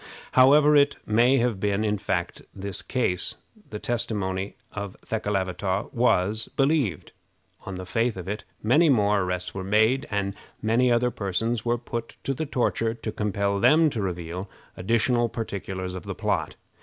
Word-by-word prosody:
However 145 Hz, +3 st, +6 dB
it 145 Hz, 0 st, +4 dB
may 120 Hz, +5 st, +4 dB
have 120 Hz, -5 st, +1 dB
been 100 Hz, +1 st, 0 dB
in 105 Hz, -1 st, 0 dB
fact 90 Hz, -1 st, -2 dB
in -, -, -19 dB
this 100 Hz, -1 st, -4 dB
case, 95 Hz, -8 st, -1 dB, 0.3 s
the 105 Hz, -, -5 dB
testimony 100 Hz, -5 st, -2 dB, 0.2 s
of 100 Hz, -2 st, -6 dB
Thekelavitaw 95 Hz, -2 st, -2 dB
was 110 Hz, -2 st, +1 dB
believed. 135 Hz, -, +1 dB, 0.6 s
On 100 Hz, -, -4 dB
the 90 Hz, 0 st, -6 dB
faith 115 Hz, +2 st, 0 dB
of 90 Hz, -1 st, -7 dB
it 105 Hz, +2 st, -4 dB, 0.2 s
many 150 Hz, +9 st, +4 dB
more 105 Hz, -5 st, +3 dB
arrests 90 Hz, 0 st, -3 dB
were 95 Hz, -, -4 dB
made, 110 Hz, +7 st, +2 dB
and 100 Hz, -1 st, -1 dB, 0.2 s
many 120 Hz, +3 st, +2 dB
other 120 Hz, +1 st, +2 dB
persons 110 Hz, +3 st, -1 dB
were 120 Hz, 0 st, +2 dB
put 115 Hz, -1 st, -6 dB
to 135 Hz, -, -1 dB
the 155 Hz, +3 st, -4 dB
torture 115 Hz, -3 st, 0 dB
to 115 Hz, -1 st, -5 dB
compel 100 Hz, -1 st, -1 dB
them 155 Hz, +7 st, +5 dB
to 110 Hz, -, -3 dB
reveal 90 Hz, 0 st, -4 dB, 0.3 s
additional 115 Hz, +4 st, +1 dB
particulars 95 Hz, -4 st, -4 dB
of 90 Hz, -3 st, -7 dB
the -, -, -5 dB
plot. -, -, -1 dB
105 Hz, 160 wpm, -25 LUFS, 95-120 Hz, 0.6 s, However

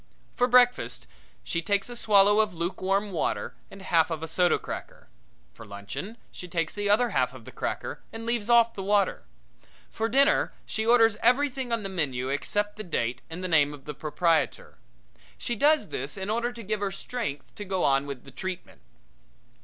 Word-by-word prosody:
For 245 Hz, -, +3 dB
breakfast 245 Hz, -, +3 dB, 0.4 s
she 170 Hz, -, -2 dB
takes 200 Hz, +2 st, 0 dB
a 245 Hz, -, -7 dB
swallow 205 Hz, -2 st, +5 dB
of 215 Hz, -4 st, +1 dB
lukewarm 190 Hz, +4 st, -1 dB
water 170 Hz, -, -2 dB, 0.2 s
and 195 Hz, 0 st, -12 dB
half 165 Hz, -2 st, +3 dB
of 160 Hz, -1 st, -4 dB
a -, -, -3 dB
soda 175 Hz, +1 st, +3 dB
cracker. -, -, -8 dB, 0.4 s
For -, -, -12 dB
luncheon 100 Hz, -, -7 dB
she 180 Hz, -, -9 dB
takes 165 Hz, -2 st, -2 dB
the 205 Hz, -1 st, -2 dB
other 230 Hz, +3 st, +3 dB
half 130 Hz, -5 st, +1 dB
of 115 Hz, -3 st, -12 dB
the -, -, -10 dB
cracker -, -, -4 dB
and 225 Hz, 0 st, -7 dB
leaves 235 Hz, -2 st, -1 dB
off 235 Hz, -1 st, +5 dB
the 195 Hz, -, -6 dB
water. 200 Hz, 0 st, +1 dB, 0.7 s
For 225 Hz, +1 st, -1 dB
dinner 275 Hz, +4 st, +3 dB
she 220 Hz, 0 st, -3 dB
orders 225 Hz, -2 st, +5 dB
everything 260 Hz, +1 st, +2 dB
on 230 Hz, -2 st, 0 dB
the -, -, -2 dB
menu 135 Hz, -9 st, -2 dB
except 205 Hz, +9 st, -1 dB
the 215 Hz, -, -5 dB
date 125 Hz, -, -2 dB
and 170 Hz, +3 st, -6 dB
the -, -, -1 dB
name 150 Hz, -4 st, +3 dB
of 140 Hz, -1 st, -18 dB
the 150 Hz, -, -5 dB
proprietor. 160 Hz, +3 st, 0 dB, 0.6 s
She 240 Hz, -, -3 dB
does 290 Hz, -2 st, +3 dB
this 140 Hz, +8 st, -4 dB
in 195 Hz, +2 st, -3 dB
order 235 Hz, +2 st, 0 dB
to 235 Hz, -1 st, -9 dB
give 215 Hz, +1 st, -2 dB
her 200 Hz, -1 st, -1 dB
strength 195 Hz, -, -5 dB
to 205 Hz, -, -7 dB
go 190 Hz, -2 st, -1 dB
on 135 Hz, +1 st, +2 dB
with 140 Hz, -3 st, -6 dB
the -, -, -13 dB
treatment. 185 Hz, -, -6 dB
195 Hz, 190 wpm, -27 LUFS, 160-225 Hz, 0.7 s, swallow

